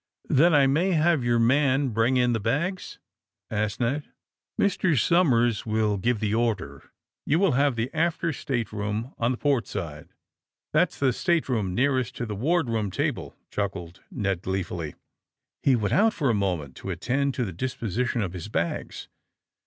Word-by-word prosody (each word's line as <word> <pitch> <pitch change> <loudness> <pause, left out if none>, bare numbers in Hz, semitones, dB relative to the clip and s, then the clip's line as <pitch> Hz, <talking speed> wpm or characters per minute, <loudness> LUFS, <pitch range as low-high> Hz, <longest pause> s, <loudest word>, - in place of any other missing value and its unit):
^'Then 165 +6 +5
I 145 -2 +6
may 165 +8 +2
have 160 -3 +3
your 120 0 +2
man 135 +3 +3
bring 115 +3 +2
in 125 -1 +3
the 115 - 0
bags?" 150 - -2 0.5
asked 105 -1 -1
Ned. 130 +5 0
^ - - -30 0.3
' - - -26
Mr. 185 -7 +2
Somers 120 - +3
will 110 -2 0
give 115 +3 0
the 105 -1 -1
order. 110 - -2 0.3
You 150 - +2
will 190 -1 +3
have 140 0 +2
the 115 +3 -3
after 170 0 0
stateroom 110 -2 -3
on 115 - +2
the 125 - -1
port 140 -5 +1
side." 80 -7 -5
^^ - - -37 0.6
That's - - +2
the 135 -3 +2
stateroom 125 - 0
nearest 130 -1 +1
to 120 - -3
the 105 -2 -5
ward 160 - +1
room 110 -3 -1
table," 90 - -3 0.2
chuckled 95 -4 -4
Ned 100 -6 -2
gleefully. 90 -5 -3 0.7
He 135 - +4
went 105 -3 -1
out, 220 +2 +4
for 140 -6 +1
a - - +1
moment, 90 -9 -2
to - - -7
attend 125 +10 -1
to 125 - -1
the 95 - -5
disposition 120 +2 -2
of 90 -3 -4
his 90 0 -6
bags. 85 -5 -3
120 Hz, 175 wpm, -26 LUFS, 105-140 Hz, 0.7 s, I